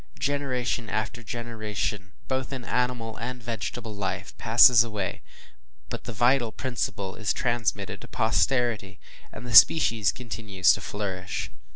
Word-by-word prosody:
Generation 130 -5 -2
after 110 +2 -3
generation, 110 -4 -4
both 130 0 -2
in 130 -3 -6
animal 125 -3 -1
and 125 +1 -6
vegetable 110 0 -5
life, 100 -2 -4
passes 115 +1 +7
away, 105 -5 -4 0.7
but - - -6
the - - -5
vital 120 +1 +2
principle 115 -6 -3
is 110 -2 -1
transmitted 120 -2 -2
to - - -10
posterity, 115 -7 0 0.3
and 110 - -9
the 120 - -5
species 115 -6 +6
continue 110 -6 -8
to 100 +2 +6
flourish. 95 -2 -4
115 Hz, 130 wpm, -26 LUFS, 105-125 Hz, 0.7 s, passes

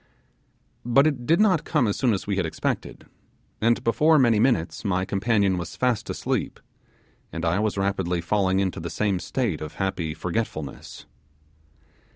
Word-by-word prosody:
But 130 +4 +4
it 135 -6 -1
did 165 +4 +4
not 190 -7 +3
come 125 - +1
as 100 - 0
soon 125 -3 +1
as 100 - -2
we 100 - -1
had 95 - +1
expected, - - -4 0.6
and 115 +1 +2
before 155 +7 +4
many 120 -6 +4
minutes 110 -9 +1
my 95 -3 0
companion 100 -2 +1
was 85 0 -6
fast 125 -4 0
asleep, - - -2 0.7
and 85 +1 -4
I 85 +4 +1
was 105 -1 -1
rapidly 95 -3 0
falling 95 +2 +1
into 95 -2 -1
the 85 +1 -5
same 100 -1 0
state 110 - -2
of 75 0 -7
happy 85 -5 -2
forgetfulness. 80 -5 -5
100 Hz, 160 wpm, -24 LUFS, 90-120 Hz, 0.7 s, But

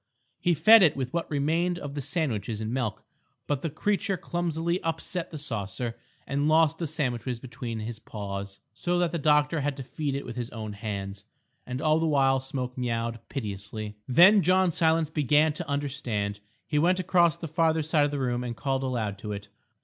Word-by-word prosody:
He 175 -1 +2
fed 215 +9 +8
it 165 -6 +5
with 130 -2 -3
what 170 -1 -2
remained 165 +5 +1
of 145 -4 -6
the 145 - -3
sandwiches 125 - -2
and 110 +1 -3
milk, 120 -5 -2 0.4
but 145 -2 -1
the 165 - -2
creature 200 +5 0
clumsily 170 +1 -1
upset 165 +2 -3
the 155 - -7
saucer 115 -3 -4 0.3
and 140 +1 0
lost 160 0 +4
the 165 - -1
sandwiches 130 -5 -2
between 120 -2 -6
its 110 +1 -5
paws, 100 -1 -6 0.2
so 175 0 -1
that 175 -1 +1
the 170 - -2
doctor 150 +1 +3
had 145 0 -1
to 135 - -5
feed 140 +2 -3
it 140 - -4
with 120 0 -7
his 120 -1 -3
own 110 -2 -6
hand. 100 -1 -5 0.4
And 125 +2 -4
all 155 0 +4
the 165 - +1
while 135 -3 +3
Smoke 130 -1 -4
meowed 115 -1 -2
piteously. 105 -2 -5
Then 180 - +7
John 185 +1 +3
Silence 160 -1 +2
began 150 +1 +3
to 150 - -6
understand. 130 -8 -2 0.3
He 150 - 0
went 180 +4 +3
across 175 -3 +3
to - - -27
the 160 -3 -6
farther 160 -1 +2
side 150 -1 +3
of - - 0
the 145 - -3
room 125 -2 -1
and 120 -2 -5
called 135 +3 -1
aloud 115 -7 -2
to 105 0 -5
it. 100 0 -7
140 Hz, 195 wpm, -27 LUFS, 115-160 Hz, 0.4 s, fed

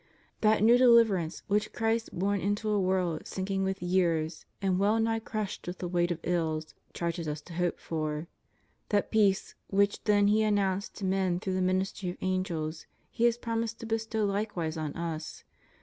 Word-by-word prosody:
That 215 -1 +3
new 235 +2 +6
deliverance 225 -9 +4
which 210 +1 0
Christ, 225 0 0
born 200 +2 +1
into 205 +2 0
a 205 - +2
world 185 -4 0
sinking 195 0 -2
with 190 -1 -2
years 170 -3 0
and 190 -2 +1
well 210 +3 +3
nigh 225 0 +1
crushed 215 -4 -4
with 175 - -4
the 180 - -4
weight 175 0 +1
of 175 - -1
ills, 160 -3 -1 0.2
charges 170 -1 -3
us 150 0 -3
to 170 - -12
hope 175 +1 -1
for; 155 -1 -3 0.6
that 205 -2 +1
peace 205 -3 +2
which 200 +1 +1
then 205 -1 +4
He 215 +1 +4
announced 200 -2 0
to 200 - -4
men 190 -2 +1
through 190 0 -3
the 185 - 0
ministry 185 0 0
of 175 - -6
angels. 170 -4 -2 0.2
He 235 - +1
has 235 0 +3
promised 230 -1 -3
to - - -5
bestow 220 -1 -1
likewise 195 -5 -2
on 155 -2 -3
us. 165 -2 -5
190 Hz, 180 wpm, -29 LUFS, 175-215 Hz, 0.6 s, new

